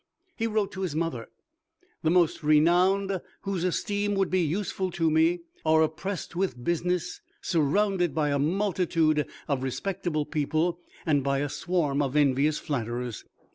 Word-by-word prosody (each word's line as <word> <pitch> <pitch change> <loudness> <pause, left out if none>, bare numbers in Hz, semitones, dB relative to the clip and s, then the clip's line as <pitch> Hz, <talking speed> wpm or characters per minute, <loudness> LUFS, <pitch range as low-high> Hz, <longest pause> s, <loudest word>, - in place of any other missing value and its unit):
He 225 -2 -1
wrote 210 -2 0
to 190 - -6
his 175 -6 -2
mother, 160 -8 -2 0.7
"The 160 - +1
most 175 -2 +3
renowned, 180 +5 +3 0.2
whose 195 -3 -2
esteem 205 +3 0
would 195 -1 +1
be 185 0 +3
useful 185 +3 -1
to 165 -2 0
me, 165 +3 +3 0.2
are 160 0 +4
oppressed 170 +4 -4
with 175 -10 -2
business, 175 +2 -1 0.2
surrounded 175 +1 +1
by 150 -2 +1
a 140 - +1
multitude 165 -2 +1 0.2
of 140 -3 0
respectable 155 +3 -2
people, 160 +3 0 0.3
and 145 -4 +2
by 140 0 +1
a 145 +1 -1
swarm 150 -4 0
of 140 -1 -1
envious 145 +1 +3
flatterers. 120 -4 -4
165 Hz, 145 wpm, -27 LUFS, 150-185 Hz, 0.7 s, are